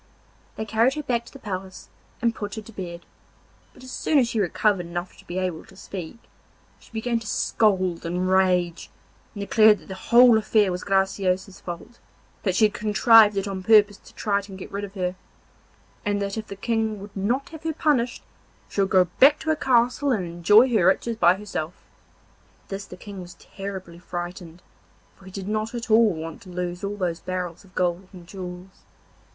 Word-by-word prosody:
They 220 - -4
carried 225 +4 +2
her 300 - -4
back 235 -4 -1
to - - -14
the - - -11
palace 190 -5 -7 0.4
and 230 -1 +3
put 205 -2 -6
her 220 - -6
to 225 - -13
bed, 175 -4 -7 0.7
but 255 - -17
as 255 - -9
soon 305 - +1
as 245 -4 +3
she 225 - -1
recovered 195 -1 +1
enough 175 +1 -5
to - - -18
be 175 - -5
able 180 -4 -2
to 190 - -18
speak, 185 0 -8 0.6
she - - -20
began 230 +1 -1
to 225 - -10
scold 185 -6 +1
and 180 +2 -1
rage, 180 -2 +2 0.5
and 200 - -5
declared 215 +1 +5
that - - -18
the - - -4
whole 235 +4 +6
affair 210 -2 +2
was 180 0 -4
Graciosa's 190 -1 0
fault, 175 +7 -8 0.4
that 190 -3 0
she 215 - +5
had 210 - +1
contrived 215 0 +5
it 195 +1 -1
on 195 -1 -4
purpose 205 0 +5
to - - -19
try 200 -2 0
and 195 -1 -10
get 190 - -9
rid 200 +1 -4
of 200 0 -8
her, 180 -1 -1 0.9
and 205 0 0
that 200 -1 -3
if 220 -1 -5
the 200 - -7
King 220 0 -1
would 200 +1 -11
not 235 +8 -1
have 320 -2 -10
her 325 0 -2
punished, 285 -6 0 0.5
she 200 - -1
would 195 - +1
go 185 -1 +5
back 285 +3 +7
to 315 - 0
her - - +2
castle 250 +1 +2
and 205 -7 0
enjoy 175 +8 +5
her 210 -7 +3
riches 230 +4 +2
by 175 -4 +5
herself. 190 -5 -5 0.9
At - - -33
this 195 0 -5
the 180 - -10
King 195 0 -9
was 175 0 -11
terribly 190 -3 -8
frightened, 175 -1 -7 0.5
for 195 - -19
he 190 - -11
did 190 0 -6
not 215 +2 -2
at 230 -1 -5
all 220 -1 +6
want 160 0 -7
to 190 - -13
lose 180 +1 -4
all 200 +1 -3
those 175 -3 -2
barrels 180 0 -5
of 190 -2 -21
gold 180 +1 -1
and 180 -3 -12
jewels. 180 0 -9
200 Hz, 200 wpm, -24 LUFS, 180-220 Hz, 0.9 s, back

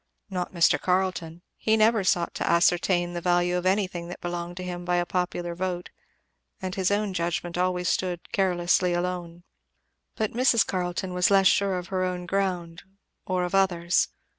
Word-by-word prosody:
Not 180 -2 -3
Mr. 170 -4 +3
Carleton; 180 -2 -1
he 220 0 +2
never 220 -1 +4
sought 175 -2 +1
to - - -2
ascertain 175 +1 +2
the 175 - -4
value 175 0 +2
of 180 +1 0
anything 185 -3 0
that 175 - -8
belonged 175 0 -5
to 185 - -5
him 175 -1 -5
by 175 0 0
a 175 0 +1
popular 175 -1 -2
vote; 180 0 -4 0.7
and 185 -1 -4
his 190 -2 0
own 205 -1 0
judgment 170 0 -2
always 180 0 0
stood 180 -2 -2
carelessly 180 -1 +2
alone. 175 -1 -4 0.7
But 215 -2 -1
Mrs. 240 -2 +3
Carleton 180 0 -3
was 180 0 +3
less 195 -1 +4
sure 195 0 +3
of 180 -1 -6
her 185 -1 -1
own 180 -1 -3
ground 180 -3 -2 0.5
or 185 -2 0
of 180 - -3
others. 175 -3 +2
180 Hz, 170 wpm, -26 LUFS, 175-190 Hz, 0.7 s, never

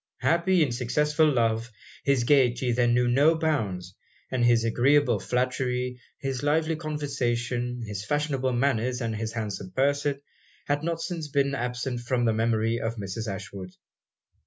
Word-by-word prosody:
Happy 170 +1 +3
in 140 - -1
successful 150 +6 +2
love, 115 -2 +1 0.3
his 140 -3 +2
gaiety 125 -2 +3
then 120 0 +2
knew 125 0 +3
no 145 +7 +4
bounds; 105 - -1 0.4
and 130 -2 0
his 120 -1 +4
agreeable 125 +1 +3
flattery, 125 +1 -1 0.2
his 135 -2 -3
lively 155 +2 +1
conversation, 125 -5 -2
his 105 -2 -5
fashionable 135 +1 0
manners, 125 -1 0
and 115 -3 -2
his 110 +1 -4
handsome 105 -4 -4
person, 140 +3 0 0.5
had 145 0 0
not 165 0 -1
since 165 -4 -4
been 140 -1 +1
absent 125 0 -2
from 120 0 0
the 115 - +3
memory 115 +1 +1
of 115 0 -2
Mrs. 105 +1 -5
Ashwood. 95 -1 -8
125 Hz, 145 wpm, -26 LUFS, 115-145 Hz, 0.5 s, no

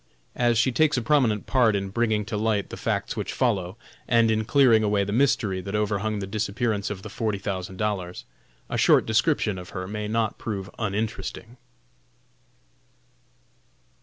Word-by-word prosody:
As 120 -1 +2
she 115 +3 +3
takes 150 +2 +2
a - - +1
prominent 115 -6 +2
part 120 -5 +3
in 100 -1 -2
bringing 110 -1 0
to 110 +1 -4
light 105 -1 0
the - - -5
facts - - -2
which - - -4
follow, 100 -5 0 0.3
and 115 -2 +4
in 110 0 0
clearing 125 -4 +5
away 105 -1 +2
the 100 - -4
mystery 110 -7 +1
that 100 +3 -5
overhung 105 0 0
the 100 - -3
disappearance 105 +1 -1
of 95 -2 -6
the - - -6
forty 110 0 -2
thousand 95 -1 -5
dollars, 95 -4 -3 0.4
a - - -2
short - - +5
description 110 - +1
of 90 - -10
her 95 0 -4
may 105 +1 -4
not 110 0 -1
prove 100 -3 -5
uninteresting. 110 +2 -3
105 Hz, 165 wpm, -25 LUFS, 100-115 Hz, 0.4 s, clearing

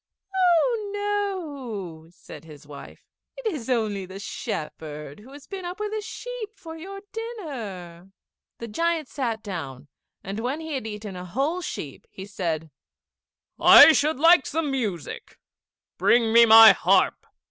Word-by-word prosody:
"Oh 390 +4 +2 1.1
no!" - - -20
said 160 -3 -13
his 150 -2 -14
wife, 145 -1 -12 0.3
"it - - -10
is 265 -5 -7
only 215 -6 -1
the 190 +1 -9
shepherd, 150 -5 -6
who 240 +6 -15
has 285 0 -13
been 390 -2 -7
up 355 +3 -6
with 425 0 -4
a 430 - -2
sheep 445 0 -8
for 325 -1 -10
your 390 +5 -9
dinner." 225 - -7 0.5
The 235 - -7
giant 330 +5 -1
sat 230 -5 -3
down, 145 - -7 0.3
and 195 +3 -5
when 255 +6 -3
he 320 -1 -6
had 260 -5 -4
eaten 210 -2 -7
a 180 0 -7
whole 275 - -2
sheep 145 - -7
he 190 - -10
said, 165 -6 -4 0.9
"I - - +9
should 300 -2 +1
like 330 -1 +5
some 310 -1 -2
music; 210 - -5 0.6
bring 230 -2 +3
me 235 0 +7
my 225 0 +10
harp." - - +1
235 Hz, 145 wpm, -24 LUFS, -, 1.1 s, my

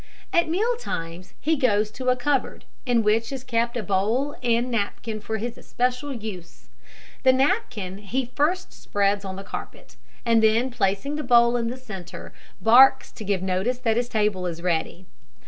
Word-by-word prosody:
At 340 -1 +3
meal 435 +9 +1
times 170 - -6
he 320 +2 +1
goes 215 -6 +1
to 255 +3 -2
a 250 - +4
cupboard, 270 +1 -1 0.2
in 240 -2 +3
which 220 +3 +1
is 265 -2 -5
kept 235 -1 0
a 230 - -2
bowl 215 +9 0
and 240 0 +1
napkin 215 0 -2
for 220 +1 -3
his 235 +2 -5
especial 250 +3 -2
use. 210 -8 -8 0.5
The 260 - +6
napkin 255 - 0
he 245 +6 -2
first 340 +6 0
spreads 200 0 0
on 190 -1 -5
the 195 - -7
carpet, - - -9 0.3
and 230 -1 +4
then 225 +4 +3
placing 205 +7 -1
the 305 - -3
bowl 235 -1 +5
in 235 -1 0
the 245 +2 -4
centre, 195 -9 -9 0.3
barks 250 +4 +6
to 230 - -9
give 195 -2 -1
notice 190 +7 0
that 230 -3 0
his 240 +1 -1
table 210 -5 0
is 170 0 -6
ready. 175 +1 -1
230 Hz, 175 wpm, -24 LUFS, 200-255 Hz, 0.5 s, The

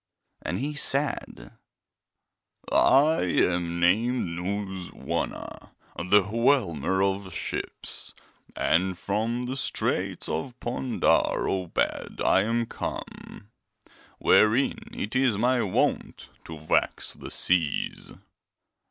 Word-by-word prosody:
And - - -3
he 145 +4 -3
said: 140 - -1 1.2
'I 150 +4 +4
am 85 -1 +1
named 110 +5 +2
Nooz 95 +1 -4
Wana, - - -5 0.2
the 95 +4 +3
Whelmer 95 - +1
of 95 -1 -1
Ships, - - -5 0.4
and 90 +1 +1
from 110 +6 -1
the 125 +2 -3
Straits 135 - -1
of 120 +11 -4
Pondar 125 +1 +1
Obed 95 -3 -2
I 95 - +4
am 115 +3 0
come, 105 -1 -7 0.7
wherein 135 - +3
it 245 - -5
is 130 -5 +3
my 125 +3 +2
wont 95 - -1 0.2
to 80 - -8
vex 80 +1 0
the - - -9
seas. 85 -5 0
105 Hz, 100 wpm, -26 LUFS, 90-125 Hz, 1.2 s, I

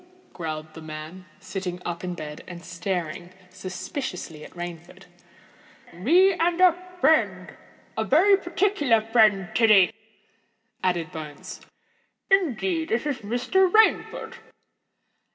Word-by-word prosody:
growled 155 -2 -6
the 160 - -10
man, 155 +4 -9
sitting 185 -1 -5
up 175 0 -4
in 180 -1 -4
bed, 150 -2 -8
and 175 -1 -9
staring 175 -1 -4 0.2
suspiciously 185 - -6
at - - -10
Rainford. 175 +1 -8 0.9
"Me 345 - +4
and 340 0 0
a 365 -2 +7 0.3
friend—a 320 -2 -1
very 370 +8 +5
particular 350 - +1
friend, 215 -4 +3
Tiddy," 215 -6 +5 0.9
added 175 -2 0
Bones. 155 -3 -8 0.7
"Indeed, 335 - +1
it's 255 +3 -1
Mr. 245 - +1
Rainford." 445 +2 +2
190 Hz, 100 wpm, -25 LUFS, -, 0.9 s, a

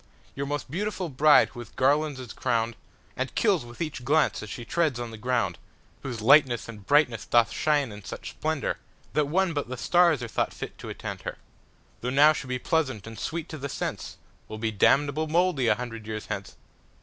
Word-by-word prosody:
Your 140 +1 -3
most 145 -2 -4
beautiful 190 0 -2
bride 145 +2 +5
who 120 - -11
with 120 - -10
garlands 145 +2 +2
is 125 -3 -8
crown'dAnd 115 -2 -3
kills - - +2
with 120 0 -12
each 150 -5 -6
glance 150 +4 +2
as 110 - -8
she 120 +3 -6
treads 155 -6 0
on 120 -1 -5
the - - -8
ground. 115 -6 -1 0.4
Whose 120 -5 -5
lightness 125 0 +5
and 105 -3 -9
brightness 145 -6 +3
doth 120 -1 +4
shine 145 -5 +1
in 105 0 -10
such - - -7
splendourThat 150 -1 -2
one 180 +3 +1
but 145 -5 -3
the 130 - -4
starsAre 170 -5 +3
thought - - -1
fit - - -6
to - - -7
attend - - -6
her, - - -6 0.6
Though 125 - -3
now 145 +4 +6
she 150 -3 -6
be 125 0 -1
pleasant 130 -7 -1
and 110 -1 -9
sweet 165 -1 -3
to 155 - -7
the 140 +1 -4
sense, - - -4 0.3
Will 110 - -7
be 110 0 -1
damnable 140 +8 +3
mouldy 165 -5 +2
a 105 - +4
hundred 115 -2 -7
years 110 -1 -4
hence. - - -5
130 Hz, 195 wpm, -27 LUFS, 115-150 Hz, 0.6 s, now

